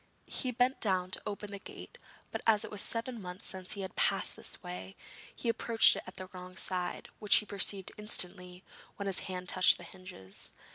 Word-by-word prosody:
He 255 - -2
bent 250 +2 +1
down 185 -3 +2
to - - -1
open 205 0 -5
the 200 - -6
gate, - - -11 0.3
but - - -4
as 215 -2 +5
it - - -9
was 210 -1 0
seven 230 0 -1
months 180 0 -8
since 185 -1 -4
he 200 - -4
had 190 -1 -6
passed - - +1
that - - -1
way 95 +2 -7 0.4
he - - -5
approached 230 0 +5
it - - -4
at 185 - -9
the 185 - -6
wrong 180 0 -9
side, 180 -1 -1
which 210 -1 +7
he 210 - +5
perceived 195 -1 +2
instantly 180 -3 -1 0.3
when 200 - -5
his 195 -2 +2
hand 180 -1 -4
touched 185 - +5
the - - -11
hinges. 180 - -5
190 Hz, 200 wpm, -32 LUFS, 180-210 Hz, 0.4 s, which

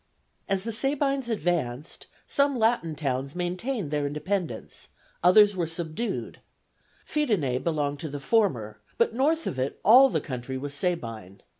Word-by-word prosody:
As 195 -1 +1
the 230 - -3
Sabines 275 +1 0
advanced, 160 - -2 0.2
some 280 -2 +2
Latin 220 -9 +1
towns 135 -1 -3
maintained 180 - -2
their 145 -1 0
independence, 150 - -4 0.4
others 205 +3 +6
were 175 -3 -1
subdued; 165 +7 -4 0.7
Fidenæ 195 - 0
belonged 145 -3 -1
to 160 - -4
the 145 0 -5
former, 130 - 0 0.2
but 235 - +2
north 305 +6 +1
of 130 - -3
it 130 +2 -2
all 255 +5 +8
the - - 0
country 130 -1 -5
was 140 +2 -5
Sabine. 115 - -3
170 Hz, 140 wpm, -26 LUFS, 140-225 Hz, 0.7 s, all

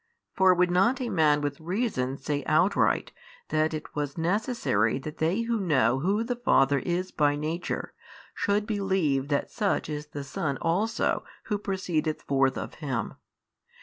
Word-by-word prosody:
for 190 -1 +5
would 180 0 +2
not 210 +9 +3
a 250 -2 -2
man 155 -6 +3
with 145 -1 -3
reason 165 - -1
say 145 +1 -2
outright 160 +6 +2 0.4
that 155 0 +1
it 155 -1 -6
was 145 0 -3
necessary 175 - +1
that 150 +3 -7
they 170 +8 +1
who 230 -1 -1
know 135 - +2
Who 200 +9 +1
the 245 +1 -2
Father 140 - +3
is 180 +5 -2
by 145 -1 +2
Nature 155 +4 -3 0.4
should 205 0 0
believe 190 -10 0
that 145 -1 -1
such 205 -7 0
is 150 0 -4
the 145 -1 -6
Son 140 +1 -3
also 195 +7 0 0.2
who 210 -2 -2
proceedeth 175 -6 -2
forth 135 -1 +2
of - - -5
Him? 130 -6 -2
160 Hz, 155 wpm, -27 LUFS, 145-195 Hz, 0.4 s, for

